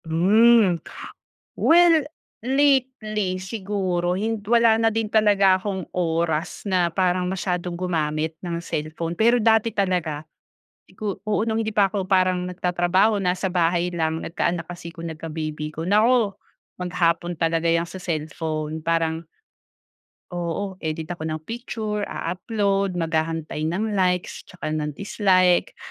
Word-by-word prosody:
Hmm 195 Hz, +2 st, +4 dB, 0.8 s
well, 330 Hz, -2 st, +5 dB, 0.4 s
lately 255 Hz, -8 st, +1 dB
siguro 190 Hz, -3 st, -2 dB
hin 220 Hz, +4 st, -1 dB
wala 230 Hz, 0 st, +4 dB
na 225 Hz, 0 st, +3 dB
din 225 Hz, -1 st, -1 dB
talaga 200 Hz, -3 st, +4 dB
akong 190 Hz, -2 st, -5 dB
oras 165 Hz, -1 st, -1 dB
na 175 Hz, -3 st, +1 dB
parang 180 Hz, -1 st, +1 dB
masyadong 180 Hz, -1 st, -2 dB
gumamit 160 Hz, -3 st, -2 dB
ng 170 Hz, -1 st, -3 dB
cellphone, 165 Hz, +1 st, -4 dB
pero 235 Hz, +3 st, +4 dB
dati 225 Hz, 0 st, +3 dB
talaga 180 Hz, -7 st, -1 dB, 0.7 s
i -, -, -19 dB
ko 205 Hz, -3 st, -4 dB
oo 215 Hz, +1 st, 0 dB
nung 225 Hz, 0 st, 0 dB
hindi 220 Hz, -, -2 dB
pa 210 Hz, -2 st, +3 dB
ako 195 Hz, 0 st, -2 dB
parang 185 Hz, -1 st, +1 dB
nagtatrabaho, 180 Hz, +3 st, +1 dB
nasa 180 Hz, +1 st, 0 dB
bahay 175 Hz, -1 st, +1 dB
lang, 160 Hz, -1 st, 0 dB
nagkaanak 170 Hz, 0 st, -1 dB
kasi 175 Hz, -1 st, -8 dB
ko 170 Hz, -1 st, -8 dB
nagka-baby 155 Hz, -1 st, -5 dB
ako. 160 Hz, +2 st, -6 dB
Naku! 215 Hz, +1 st, +3 dB, 0.5 s
Maghapon 175 Hz, -1 st, 0 dB
talaga 165 Hz, 0 st, +1 dB
yang 170 Hz, +1 st, +1 dB
sa 185 Hz, +2 st, -9 dB
cellphone 155 Hz, -1 st, -3 dB
parang 165 Hz, 0 st, 0 dB, 1.1 s
oo 175 Hz, +2 st, -4 dB
edit 160 Hz, 0 st, -4 dB
ako 160 Hz, -2 st, -4 dB
ng 155 Hz, 0 st, -4 dB
picture 215 Hz, -1 st, -4 dB
a-upload 195 Hz, +1 st, -1 dB
mag-hahantay 160 Hz, -2 st, -2 dB
ng 205 Hz, +7 st, -1 dB
likes 180 Hz, -3 st, -1 dB
at -, -, -14 dB
saka 175 Hz, -, -8 dB
ng 150 Hz, -1 st, -3 dB
dislike. 185 Hz, -2 st, +2 dB
180 Hz, 130 wpm, -23 LUFS, 165-205 Hz, 1.1 s, well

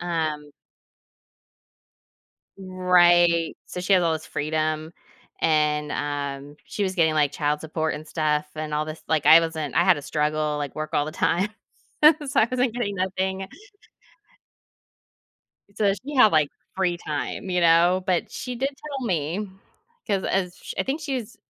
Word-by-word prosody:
Um 155 Hz, -4 st, -3 dB, 2.1 s
Right. 175 Hz, -3 st, +3 dB
So, 180 Hz, -, -6 dB
she 185 Hz, -, 0 dB
has 185 Hz, -2 st, +5 dB
all 165 Hz, -1 st, +2 dB
this 160 Hz, 0 st, -4 dB
freedom, 155 Hz, +1 st, -2 dB, 0.5 s
and, 150 Hz, -1 st, +1 dB
um, 145 Hz, 0 st, -4 dB
she 210 Hz, -, -4 dB
was 190 Hz, -1 st, -1 dB
getting, 160 Hz, -3 st, +2 dB
like, 150 Hz, -2 st, +2 dB
child 150 Hz, 0 st, -1 dB
support 160 Hz, 0 st, -2 dB
and 155 Hz, -, -8 dB
stuff 150 Hz, -2 st, 0 dB
and 155 Hz, -1 st, -4 dB
all 150 Hz, +1 st, 0 dB
this 155 Hz, +1 st, -8 dB
like, 160 Hz, -2 st, +1 dB
I 165 Hz, -, +9 dB
wasn't 160 Hz, -4 st, -4 dB
I -, -, +4 dB
had 185 Hz, -, +6 dB
to 145 Hz, -, -7 dB
struggle, 150 Hz, +1 st, -1 dB
like, 145 Hz, -2 st, -4 dB
work 155 Hz, 0 st, -5 dB
all 145 Hz, -, +1 dB
the 155 Hz, -, -6 dB
time, 185 Hz, +4 st, +1 dB, 0.6 s
so 300 Hz, -2 st, +5 dB
I 220 Hz, -, +3 dB
wasn't 250 Hz, -2 st, 0 dB
getting 225 Hz, -5 st, -2 dB
nothing. 190 Hz, +1 st, -2 dB, 2.3 s
So, 205 Hz, -2 st, +2 dB
she 260 Hz, +10 st, -7 dB
had, 250 Hz, -6 st, +6 dB
like, 155 Hz, -2 st, +3 dB, 0.3 s
free 180 Hz, -2 st, +1 dB
time, 155 Hz, +3 st, -4 dB
you 180 Hz, -1 st, +1 dB
know? 175 Hz, +2 st, +4 dB
But 180 Hz, -2 st, 0 dB
she 250 Hz, -1 st, -6 dB
did 265 Hz, +3 st, -1 dB
tell 280 Hz, -2 st, -7 dB
me 175 Hz, +3 st, -2 dB, 0.6 s
'cause 200 Hz, -4 st, -1 dB
as 180 Hz, -2 st, -1 dB
sh -, -, -8 dB
I -, -, +2 dB
think 275 Hz, +4 st, -3 dB
she's 260 Hz, -7 st, -4 dB
170 Hz, 160 wpm, -24 LUFS, 155-190 Hz, 2.3 s, I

